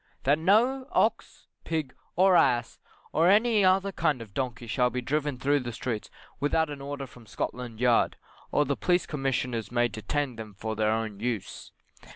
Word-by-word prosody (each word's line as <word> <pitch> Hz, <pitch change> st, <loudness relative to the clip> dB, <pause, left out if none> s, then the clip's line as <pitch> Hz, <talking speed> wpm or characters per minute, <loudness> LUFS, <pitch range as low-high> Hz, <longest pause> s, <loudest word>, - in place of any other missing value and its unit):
That 145 Hz, +3 st, +3 dB
no 240 Hz, +10 st, +3 dB
ox, 225 Hz, +1 st, 0 dB, 0.2 s
pig, 155 Hz, -5 st, -2 dB, 0.2 s
or 185 Hz, +1 st, +5 dB
ass, 120 Hz, -7 st, +2 dB, 0.3 s
or 165 Hz, +3 st, +4 dB
any 215 Hz, +1 st, +4 dB
other 190 Hz, +1 st, +3 dB
kind 150 Hz, -7 st, 0 dB
of 110 Hz, -4 st, -10 dB
donkey 125 Hz, -1 st, -3 dB
shall 125 Hz, +2 st, +1 dB
be 125 Hz, -, -3 dB
driven 145 Hz, +2 st, -1 dB
through 145 Hz, +3 st, +2 dB
the 125 Hz, -2 st, -5 dB
streets 115 Hz, -1 st, -4 dB, 0.3 s
without 150 Hz, +2 st, +1 dB
an 140 Hz, -1 st, -7 dB
order 140 Hz, 0 st, -5 dB
from 120 Hz, -3 st, -16 dB
Scotland 120 Hz, +1 st, -5 dB
yard, 125 Hz, -1 st, +3 dB, 0.4 s
or 145 Hz, -, +3 dB
the 140 Hz, -, 0 dB
Police 180 Hz, +3 st, +1 dB
Commissioners 125 Hz, -, -2 dB
may 120 Hz, 0 st, +2 dB
detain 130 Hz, +3 st, -3 dB
them 110 Hz, -3 st, -8 dB
for 110 Hz, +3 st, -4 dB
ther 110 Hz, 0 st, +1 dB
own 110 Hz, -2 st, -2 dB
use. 115 Hz, -3 st, -4 dB
135 Hz, 175 wpm, -28 LUFS, 120-160 Hz, 0.4 s, or